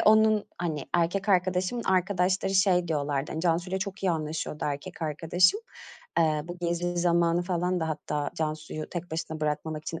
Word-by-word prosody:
ve - - +1
onun, 215 -1 +5
hani, 160 -5 -2
erkek 180 +4 +1
arkadaşımın 185 +4 +2
arkadaşları 190 +1 +1
şey 185 -3 +4
diyorlardı. 145 -2 -1
Hani, 160 - -3
Cansu’yla 175 +2 +1
çok 195 0 -5
iyi 190 - +3
anlaşıyordu, 155 -1 -3
erkek 145 +3 -4
arkadaşım. 165 - +3 0.6
Eee, 155 -2 +3
bu 175 +1 -7
Gezi 175 0 -1
zamanı 170 0 +3
falan 180 0 0
da 160 - -1
hatta 150 -1 -2
Cansu’yu 155 -1 -3
tek 175 -1 -5
başına 160 -1 -4
bırakmamak 155 0 -2
için 165 +1 -5
175 Hz, 160 wpm, -28 LUFS, 155-185 Hz, 0.6 s, onun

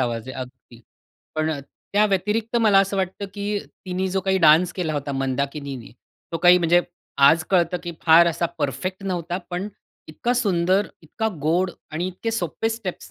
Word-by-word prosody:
आवाज 120 -1 -2
आहे - - -7
अगदी. 125 -2 -11 0.5
पण 155 0 0
अ, 150 -3 -3 0.3
त्या 205 +1 +4
व्यतिरिक्त 210 +4 0
मला 210 -3 +5
असं 195 0 -1
वाटतं, 190 +1 -2
की 205 0 -2 0.3
तिनी 185 +1 -1
जो 190 +1 0
काही 190 0 +1
डान्स 165 +1 +5
केला 170 -4 -2
होता 145 -1 -3
मंदाकिनीने, 135 -1 -3 0.4
तो 165 - -1
काही 180 +1 +6
म्हणजे, 175 0 +4 0.4
आज 160 +4 +6
कळतं 180 -2 +2
की 175 -1 -5
फार 170 +1 +7
असा 170 0 0
परफेक्ट 185 - -3
नव्हता, 175 -2 -2
पण 180 +3 -3 0.4
इतका 235 +10 -1
सुंदर, 190 -3 +2 0.2
इतका 220 +8 -2
गोड 175 +4 +1 0.2
आणि 170 +4 -2
इतके 185 +5 -4
सोप्पे 225 0 -2
स्टेप्स 220 -5 -6
175 Hz, 170 wpm, -23 LUFS, 155-195 Hz, 0.5 s, फार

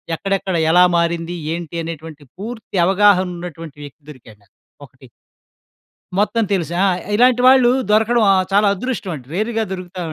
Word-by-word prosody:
ఎక్కడెక్కడ? 195 +1 -2 0.2
ఎలా 180 +2 +6
మారింది? 170 0 -1 0.2
ఏంటి? 170 -1 -7
అనేటువంటి 160 -2 -9
పూర్తి 220 0 -8
అవగాహన 190 0 +3
ఉన్నటువంటి 165 -3 -9
వ్యక్తి 145 +2 -15
దొరికాడు 115 -7 -14
నాకు, - - -34 0.3
ఒకటి. - - -19 1.1
మొత్తం 220 +3 +1
తెలుసు 170 -4 -1
ఆ! - - +4 0.3
ఇలాంటి 245 +2 +3
వాళ్ళు 255 -2 +6 0.2
దొరకడం 220 +2 +3
ఆహ్, 190 -1 +2
చాలా 205 +1 +3
అదృష్టం 225 -2 -4
అండి. 130 -5 -10
రేర్‌గా 220 +3 -1
దొరుకుతావు. 180 -3 -6
185 Hz, 140 wpm, -18 LUFS, 165-215 Hz, 1.1 s, ఎలా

